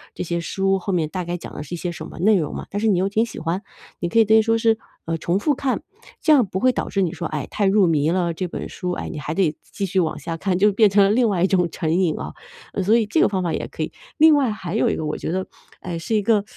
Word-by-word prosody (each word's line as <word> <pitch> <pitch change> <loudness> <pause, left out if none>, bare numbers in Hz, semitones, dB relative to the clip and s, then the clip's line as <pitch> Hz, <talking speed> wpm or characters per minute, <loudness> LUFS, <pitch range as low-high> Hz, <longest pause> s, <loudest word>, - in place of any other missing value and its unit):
这 - - -3
些 170 0 -2
书 195 +3 0
后 195 +1 -3
面 160 -4 0
大 185 +2 -3
概 175 +1 -3
讲 - - -10
的 - - -6
是 165 +4 -6
一 - - -6
些 175 +1 -3
什 175 - -8
么 - - -11
内 205 +3 +4
容 155 -4 -2
嘛， - - -6
但 205 - -3
是 220 - +1
你 195 - +3
又 190 +2 +1
挺 220 +3 +2
喜 235 - -10
欢。 165 +4 -2 0.4
你 175 - -1
可 230 - -1
以 225 - +6
等 220 +1 +5
于 - - +6
说 225 +1 +2
是， 225 -1 +2 0.3
呃， 165 0 -2
重 170 +4 0
复 290 +7 +1
看， 260 -2 -1 0.4
这 310 - +5
样 265 -6 +5
不 190 -1 -4
会 255 +3 +3
导 - - -3
致 195 - 0
你 175 -4 0
说， 170 - -5
哎， 150 -3 -4
太 205 - -1
入 195 -1 +4
迷 155 -1 +2
了， 175 -1 0
这 180 +2 -4
本 - - -5
书， 180 - -4
哎， - - -4
你 160 - -6
还 150 +1 -4
得 165 -4 +1 0.2
继 200 - -3
续 190 0 0
往 160 -2 -2
下 165 -1 -4
看， 185 +2 -1
就 205 +1 +4
变 215 +1 +5
成 200 +1 +4
了 - - +3
另 230 +2 +3
外 185 -4 0
一 - - +5
种 180 -3 +2
成 160 -2 -1
瘾 180 -4 +2
啊。 75 +2 -6 0.5
所 215 +5 +4
以 230 - +1
这 210 - +1
个 - - +4
方 190 -2 -1
法 175 -2 -1
也 - - -2
可 - - -7
以， - - -3 0.2
另 315 -1 +7
外 270 -5 +2
还 190 -3 -5
有 - - +2
一 - - 0
个 160 - -3
我 150 - -2
觉 - - -4
得， 185 +2 -2 0.3
哎， 180 - -7
呃， 165 - -3
是 165 +7 -4
一 210 - +3
个 210 0 +2
190 Hz, 340 characters per minute, -22 LUFS, 170-215 Hz, 0.5 s, 另